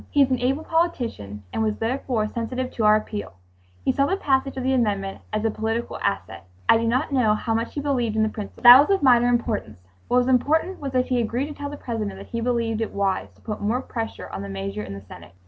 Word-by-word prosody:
He 285 - +4
is 265 - -1
an 255 - +1
able 270 +5 0
politician 240 - -2
and - - -1
was 215 -1 0
therefore 230 -1 -1
sensitive 250 +3 -4
to 220 - -1
our 210 0 +7
appeal; 210 - -4 0.5
he - - +4
saw 275 0 +1
the 385 - 0
passage 270 -5 0
of 260 - -3
the 265 +1 +1
amendment 200 -6 -1
as 215 +1 -1
a 225 - +2
political 225 +2 -3
asset. 95 - -3 0.2
I - - +6
do 230 0 -1
not 255 +6 0
know 225 -5 +3
how 225 +1 -2
much 230 +1 -2
he 290 - -2
believed 250 -6 0
in 220 - +3
the 220 - +1
principle. 215 +2 -8
That 245 +1 +11
was 290 - +3
of 390 -6 +2
minor 245 -2 +5
importance. 235 - -1 0.3
What 245 - +2
was 250 0 +3
important 315 +8 +2
was 275 -2 -5
that 255 0 +2
he 250 -2 +2
agreed 245 +6 -2
to - - -6
tell 285 0 -6
the 290 - -7
President 215 -7 -4
that 195 - -9
he 230 - -3
believed 230 -2 0
it 225 - -3
wise 195 -1 0
to - - -25
put 210 -2 -5
more 220 +5 0
pressure 230 -3 -5
on 95 - -6
the 100 - -6
measure 100 +1 -4
in 100 -2 -7
the 100 - -9
Senate. 90 -3 -13
235 Hz, 250 wpm, -24 LUFS, 215-260 Hz, 0.5 s, That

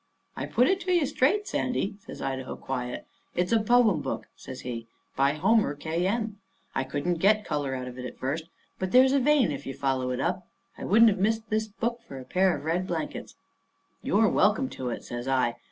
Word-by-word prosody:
"I - - -4
put 250 +2 +3
it 385 - +2
to 365 -1 -2
you 345 -4 +3
straight, 400 +11 +1
Sandy," 225 -5 -1
says - - -8
Idaho, 130 -1 -3
quiet. 125 -2 -4 0.3
"It's 180 +1 0
a 230 - +5
poem 220 -7 +4
book," 135 - -4
says 130 - -9
he, 115 -2 -6 0.3
"by 140 +1 +3
Homer 200 0 +2
K. 165 +5 -1
M. 215 -1 -2 0.3
I - - 0
couldn't 145 +6 -2
get 210 +3 +3
colour 145 -3 -2
out 125 -1 -5
of 125 0 -8
it 125 - -5
at - - -8
first, 145 +5 -2 0.3
but 190 0 -3
there's 260 +1 +6
a 280 - +4
vein 270 - +3
if - - -6
you 135 - -5
follow 130 -2 0
it 125 - -2
up. 180 +1 -1 0.3
I - - -7
wouldn't 225 +3 +6
have 195 - -3
missed 220 +3 0
this 220 0 +1
book 235 +4 -3
for 135 - -8
a 130 - -8
pair 185 +6 +2
of 145 - -10
red 175 +3 0
blankets." 165 -4 -4 0.7
"You're 215 +3 +3
welcome 215 +7 +2
to 130 -1 -5
it," 120 - -5
says 120 +1 -6
I. 130 -3 +1
180 Hz, 215 wpm, -27 LUFS, 135-225 Hz, 0.7 s, there's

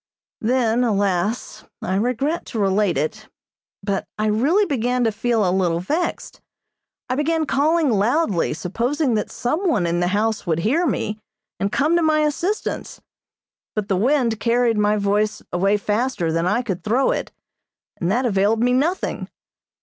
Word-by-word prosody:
Then, 240 0 +1
alas, 205 -1 -1 0.2
I 185 - -2
regret 250 - -1
to 225 - -4
relate 195 -3 +2
it, 215 +10 -3 0.6
but 195 -2 -2
I 215 - 0
really 275 - +2
began 250 - 0
to 225 - +2
feel 225 -1 0
a - - +2
little 175 -3 +1
vexed. 310 - -3 0.7
I 255 - -1
began 315 +3 0
calling 305 +1 +2
loudly, 210 - +1
supposing 245 - -1
that 215 - -1
someone 280 - 0
in 170 +1 0
the 175 - +1
house 210 +2 0
would 160 -2 +1
hear 315 - +2
me, 210 -6 -2 0.4
and 200 - -1
come 305 +8 +2
to - - +2
my 310 -1 +3
assistance; 335 +8 -2 0.8
but 210 -2 -2
the 195 - +2
wind 235 +1 +1
carried 235 -1 +2
my 210 0 +2
voice 210 +1 0
away 195 +4 +2
faster 210 -4 -1
than 165 +2 0
I 220 +6 +1
could 190 -7 -4
throw 245 +5 +2
it, - - -3 0.7
and 175 +1 -1
that 250 +5 +1
availed 215 +1 +2
me 250 0 +3
nothing. 315 +9 -1
225 Hz, 155 wpm, -21 LUFS, 200-265 Hz, 0.8 s, my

